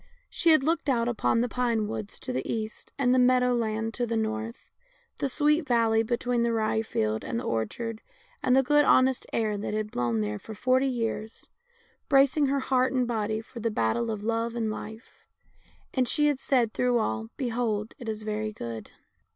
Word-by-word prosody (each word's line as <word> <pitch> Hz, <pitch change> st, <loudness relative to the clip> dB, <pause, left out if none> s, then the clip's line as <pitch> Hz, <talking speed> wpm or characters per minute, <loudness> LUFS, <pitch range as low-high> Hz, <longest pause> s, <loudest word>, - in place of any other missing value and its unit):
She 340 Hz, -, +2 dB
had 310 Hz, -4 st, +6 dB
looked 320 Hz, 0 st, 0 dB
out 235 Hz, -3 st, +2 dB
upon 230 Hz, -1 st, +1 dB
the 245 Hz, -, +1 dB
pine 235 Hz, -3 st, 0 dB
woods 210 Hz, -1 st, -5 dB
to 255 Hz, -, -4 dB
the -, -, -2 dB
east 220 Hz, -1 st, -5 dB
and 250 Hz, -3 st, +3 dB
the 255 Hz, -, +4 dB
meadow 250 Hz, 0 st, +4 dB
land 225 Hz, -1 st, -1 dB
to 240 Hz, +1 st, -1 dB
the 230 Hz, 0 st, -1 dB
north, 225 Hz, +2 st, -4 dB, 0.5 s
the 275 Hz, -, 0 dB
sweet 300 Hz, +3 st, +2 dB
valley 230 Hz, -2 st, +3 dB
between 240 Hz, +1 st, 0 dB
the 235 Hz, 0 st, +2 dB
rye 220 Hz, -1 st, +1 dB
field 110 Hz, -, -1 dB
and 115 Hz, -, -3 dB
the -, -, -5 dB
orchard, 215 Hz, -, -3 dB, 0.4 s
and 255 Hz, -, +3 dB
the 270 Hz, -, +5 dB
good 295 Hz, +3 st, +4 dB
honest 260 Hz, -2 st, +3 dB
air 215 Hz, -2 st, 0 dB
that 210 Hz, -, -3 dB
had 215 Hz, 0 st, -2 dB
blown 120 Hz, -2 st, 0 dB
there 105 Hz, 0 st, -3 dB
for 220 Hz, -, -9 dB
forty 255 Hz, +5 st, +2 dB
years, 225 Hz, -3 st, -3 dB, 0.6 s
bracing 280 Hz, +1 st, +4 dB
her 275 Hz, 0 st, +1 dB
heart 260 Hz, 0 st, +1 dB
and 255 Hz, -2 st, +1 dB
body 220 Hz, -2 st, -1 dB
for 230 Hz, +1 st, -11 dB
the 230 Hz, +1 st, 0 dB
battle 210 Hz, -, 0 dB
of 215 Hz, -2 st, -4 dB
love 230 Hz, +1 st, -1 dB
and 225 Hz, -2 st, -1 dB
life, 220 Hz, +2 st, -9 dB, 0.7 s
and 255 Hz, -2 st, +1 dB
she 295 Hz, +4 st, +2 dB
had 290 Hz, -3 st, +2 dB
said 245 Hz, -6 st, +1 dB
through 250 Hz, -1 st, +2 dB
all, 110 Hz, -, -1 dB
Behold 225 Hz, -4 st, -1 dB
it 235 Hz, -, -6 dB
is 215 Hz, 0 st, -4 dB
very 215 Hz, 0 st, -2 dB
good. 115 Hz, -, -7 dB
230 Hz, 195 wpm, -27 LUFS, 215-255 Hz, 0.7 s, had